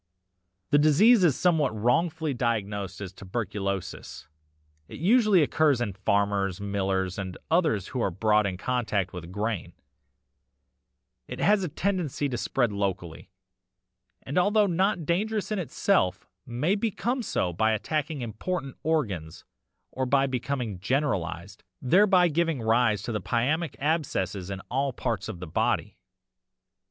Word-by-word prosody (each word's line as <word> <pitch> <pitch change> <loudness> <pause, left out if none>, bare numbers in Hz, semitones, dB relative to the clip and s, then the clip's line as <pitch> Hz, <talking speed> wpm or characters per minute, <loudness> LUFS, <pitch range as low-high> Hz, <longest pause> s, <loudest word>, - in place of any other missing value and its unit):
"'The 145 - +5
disease 190 - +5
is 155 -7 +3
sometimes 160 -6 +2
wrongfully 150 +7 +1
diagnosed 105 -5 -2
as 95 -2 -6
tuberculosis; 100 -3 -5 0.6
it - - -9
usually 205 - +4
occurs 145 -2 +2
in 115 -5 -2
farmers, 100 -1 0
millers, 95 -2 -1
and 95 -2 -5
others 155 - +2
who 130 - -3
are 100 - +1
brought 105 +3 +2
in 95 -2 -4
contact 105 -4 -1
with 90 -1 -8
grain; 105 -4 -3 1.5
it - - -7
has 205 -1 +3
a 180 - -2
tendency 175 -5 -1
to 130 - -3
spread 120 -1 0
locally, 95 -5 -4 0.9
and 140 +7 0
although 205 +3 +3
not 180 -2 0
dangerous 210 +6 -1
in 210 - 0
itself, 180 - 0 0.2
may 135 +10 0
become 230 +4 -1
so 90 - -1
by 110 +6 +2
attacking 150 +6 -2
important 135 - -4
organs 100 - -2 0.5
or 130 0 -2
by 135 +1 +3
becoming 125 -5 -3
generalised, 100 - -2 0.2
thereby 185 +5 +4
giving 165 -2 0
rise 110 -2 +2
to - - -4
pyæmic 135 - -1
abscesses 105 - -1
in 95 -1 -5
all 135 +5 -1
parts 115 -3 -3
of 95 -6 -6
the 90 - -6
body. 80 - -1
125 Hz, 130 wpm, -27 LUFS, 100-160 Hz, 1.5 s, The